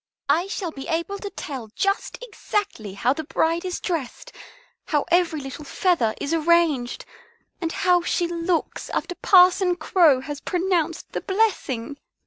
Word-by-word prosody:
I 330 +6 +3
shall 385 -4 -4
be 270 -3 -8
able 335 +5 -2
to 405 - -5
tell 270 - -7
just 395 +1 -1
exactly 405 - -3
how 250 +6 +2
the 315 - -5
bride 330 +2 0
is 365 -1 -3
dressed, 335 - -4 0.5
how 295 -4 0
every 345 -3 +3
little 270 +2 -7
feather 290 - +1
is 290 - -2
arranged, 325 -6 +2 0.6
and 330 -1 -1
how 360 0 +3
she 345 0 0
looks 340 0 -2
after 360 - -2
Parson 360 0 +5
Crow 330 -7 +4
has 290 +2 -6
pronounced 350 -3 -1
the - - -3
blessing. 335 - -1
335 Hz, 145 wpm, -23 LUFS, 290-365 Hz, 0.6 s, Parson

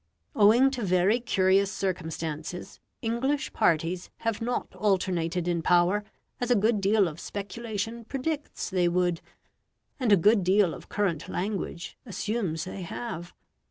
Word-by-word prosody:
Owing 230 +6 +6
to 255 -3 -4
very 185 +4 +3
curious 195 -3 +2
circumstances 165 -3 -4 0.2
English 260 +5 -1
parties 175 -2 +1
have 230 -1 -1
not 245 +2 -2
alternated 180 -4 0
in 170 -1 0
power, 180 +5 +3 0.4
as 245 - -2
a 245 - +5
good 215 0 +2
deal 200 0 +4
of 160 0 -7
speculation 225 +3 -5
predicts 290 +4 -3
they 180 -2 +2
would, 175 -1 +1 0.8
and 245 -5 +1
a 200 - +8
good 205 +3 +4
deal 185 -1 +3
of - - -11
current 185 -7 -1
language 185 -3 -4
assumes 205 -6 -2
they 185 +1 -6
have. 175 -1 -6
195 Hz, 135 wpm, -27 LUFS, 175-225 Hz, 0.8 s, a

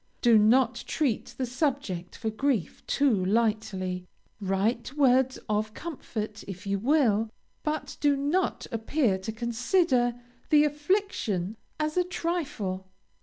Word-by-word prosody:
Do 235 -3 +7
not 240 +3 +4
treat 275 -8 -1
the 260 - 0
subject 250 - -2
for 220 -2 -3
grief 230 - -1
too 255 -10 +2
lightly. 190 -3 0 0.3
Write 210 +6 -1
words 260 -2 +4
of 215 0 -1
comfort 220 -10 -5
if 190 -1 -7
you 200 0 0
will, 225 -4 +3 0.3
but 305 0 -3
do 290 -1 +3
not 295 +7 0
appear 225 -2 +1
to 190 +4 -4
consider 240 +3 +1 0.3
the 300 -1 +6
affliction 295 - 0 0.2
as 305 +2 -1
a 360 - +5
trifle. 295 - -3
235 Hz, 125 wpm, -28 LUFS, 210-290 Hz, 0.3 s, Do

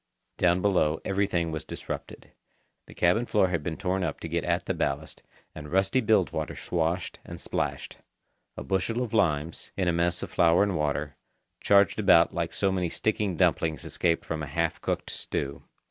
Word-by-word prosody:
Down 90 0 +3
below 80 -6 +2
everything 95 -4 0
was 80 -1 -4
disrupted. - - -7 0.6
The - - -13
cabin 100 +8 +2
floor 95 -3 +3
had 85 -3 -1
been 80 +1 -4
torn 95 0 -1
up - - -3
to - - -4
get - - -1
at - - 0
the - - -1
ballast, 70 +3 -3 0.3
and 75 -1 -9
rusty 95 +7 +2
bilge 110 -5 +3
water 80 -2 -3
swashed 85 +1 -2
and - - -9
splashed. - - -3 0.6
A - - -5
bushel 95 - 0
of 115 - -6
limes, 80 -6 0
in 95 -2 0
a 85 - +2
mess 85 +1 0
of - - -6
flour 85 +2 +4
and 100 -3 0
water, 75 -2 -2 0.4
charged 100 +1 +4
about 90 -5 +5
like 85 -1 -2
so 95 -1 +1
many 90 -2 -1
sticky 105 -1 -1
dumplings 80 -2 +1
escaped 85 -2 0
from 80 -1 -3
a 75 - -4
half 65 - -1
cooked - - -2
stew. 70 0 -4
85 Hz, 180 wpm, -27 LUFS, 80-95 Hz, 0.6 s, about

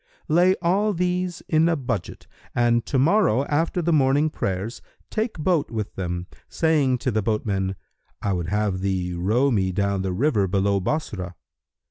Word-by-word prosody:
Lay 175 +4 +4
all 200 +5 +2
these 180 0 -1
in 160 +1 +3
a 165 - +1
budget[FN#315] 120 -8 -4 0.3
and 120 -1 +2
to 135 - 0
morrow, 140 - +3
after 165 +4 0
the 170 +1 +2
morning 145 +1 +3
prayers, 100 +2 -3 0.3
take 220 -1 -2
boat 160 -1 +1
with 110 -2 -4
them, 90 -1 -3 0.2
saying 150 -6 +2
to 130 +1 -1
the 110 0 +1
boatman, 100 -3 -1 0.5
'I 100 - +1
would 85 -2 -2
have 105 -2 0
thee 95 -2 -1
row 110 +11 +1
me 95 -5 +1
down 100 +1 0
the 95 0 -2
river 105 -1 +1
below 100 +1 +1
Bassorah.' 95 - -3
120 Hz, 160 wpm, -24 LUFS, 95-160 Hz, 0.5 s, Lay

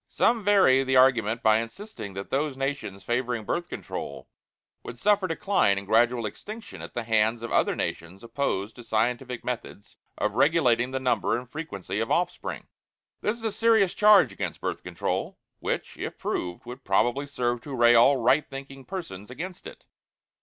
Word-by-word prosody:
Some 230 -2 +2
vary 190 -10 +5
the 130 0 0
argument 120 -3 +4
by 110 0 +5
insisting 115 - -7
that 95 +1 -7
those 140 0 -1
nations 135 -8 -4
favoring 120 -1 -1
Birth 175 +7 -2
Control - - -6 0.5
would - - -9
suffer 205 -2 +2
decline 165 - +2
and 100 - -4
gradual 115 +3 +3
extinction 215 - -8
at - - -9
the 120 - -2
hands 110 +1 +1
of 115 - -5
other - - +2
nations 85 +5 -5
opposed 115 -4 -2
to 120 - -10
scientific 120 +3 -1
methods 115 -4 -6 0.2
of - - -1
regulating 130 -6 +3
the 130 0 -2
number 130 -2 +1
and 125 +1 -7
frequency 105 - -5
of 115 - -1
offspring. 175 +1 -1 0.6
This 210 +3 -1
is 230 - -14
a 220 - 0
serious 220 -4 +3
charge 210 -2 +6
against - - -4
Birth - - -3
Control, - - -3 0.2
which - - -3
if - - -5
proved 90 +3 -4
would 125 +2 -9
probably 120 +8 +1
serve 120 -3 -1
to 140 +1 -6
array 120 -1 +6
all 120 +4 +6
right 130 +5 +2
thinking 135 -1 -9
persons 130 - -7
against 175 +8 -7
it. - - -13
125 Hz, 170 wpm, -26 LUFS, 115-155 Hz, 0.6 s, charge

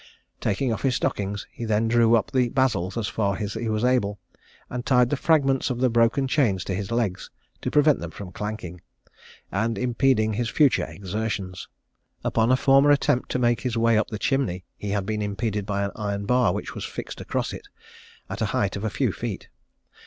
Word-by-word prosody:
Taking 115 +4 0
off - - -4
his 130 -3 +1
stockings, 100 0 -2
he - - -8
then 110 0 +1
drew 115 0 +4
up 110 -4 0
the 125 -2 +2
basils 115 -8 0
as 110 -3 -1
far 100 -3 -1
as 105 -2 -3
he 115 0 -3
was 110 +1 -1
able, 120 -5 +1 0.5
and 125 -1 -4
tied 125 -2 +3
the - - +3
fragments 135 -3 +2
of 125 - -2
the 130 -1 +2
broken 115 +4 +3
chains 115 - +1
to 95 - -3
his 95 +1 -3
legs, 115 -6 -1 0.3
to - - -2
prevent 150 0 +4
them 85 - -5
from 90 +2 -9
clanking, 95 -4 -6 0.7
and 115 +4 0
impeding 120 -3 +2
his 115 +1 -1
future 135 +4 +3
exertions." 100 -2 -4 0.6
Upon 115 +2 +2
a 130 - +5
former 135 +2 +5
attempt 145 -2 +2
to - - +1
make 120 -1 +2
his 125 -3 -2
way 115 0 +3
up 110 - +2
the 105 - -5
chimney, 110 -8 -1
he 105 - -6
had 100 -1 -1
been 105 +1 -2
impeded 105 0 -2
by 100 -1 0
an 100 - -2
iron 100 -1 -3
bar 125 -3 +3
which - - -4
was - - -6
fixed - - -6
across - - -2
it, - - -9 0.6
at - - -6
a - - +2
height - - 0
of 100 - -5
a 110 - 0
few - - 0
feet. - - -5
115 Hz, 205 wpm, -25 LUFS, 100-125 Hz, 0.7 s, a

